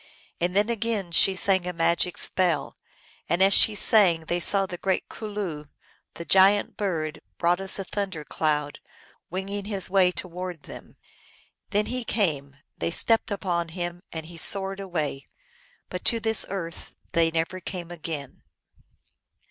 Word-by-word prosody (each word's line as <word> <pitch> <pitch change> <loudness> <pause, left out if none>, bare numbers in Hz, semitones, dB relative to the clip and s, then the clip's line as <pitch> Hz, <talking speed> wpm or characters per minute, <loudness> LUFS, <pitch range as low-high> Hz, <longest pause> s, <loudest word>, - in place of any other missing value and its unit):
So 175 - +3
then 200 +4 +1
again 225 -5 -2
she 190 +3 +4
sang 190 -1 +1
a 180 - -2
magic 170 +1 0
spell, 175 -6 +1 0.5
and 170 - +1
as 195 +1 +5
she 215 - +7
sang 195 -6 +4
they 175 +2 -2
saw 195 +3 +4
the 180 -2 -7
great 190 -1 -1
Cul 215 - -7
loo, 175 -8 -5 0.5
the 170 - -7
giant 195 +3 +4
bird, 165 -6 -3 0.2
broad 175 +2 +1
as 195 - +2
a 195 - -3
thunder 190 -5 -4
cloud, 150 -1 -1 0.5
winging 195 +2 -4
his 195 -3 -1
way 190 -2 +4
towards 180 -2 -7
them. - - -12 0.7
Then 210 +1 +1
he 250 0 -3
came; 155 - -1 0.2
they - - -1
stepped 225 +7 +1
upon 180 -4 -2
him, 175 +1 -5
and 160 -1 -6
he 170 +1 -11
soared 195 +3 +3
away. 155 -8 -3 0.6
But - - -6
to 230 - +2
this 220 0 +2
earth 170 -4 -6 0.2
they 165 -1 +3
never 165 +3 -2
came 175 -1 -7
again. 155 -5 -6
180 Hz, 155 wpm, -25 LUFS, 165-200 Hz, 0.7 s, she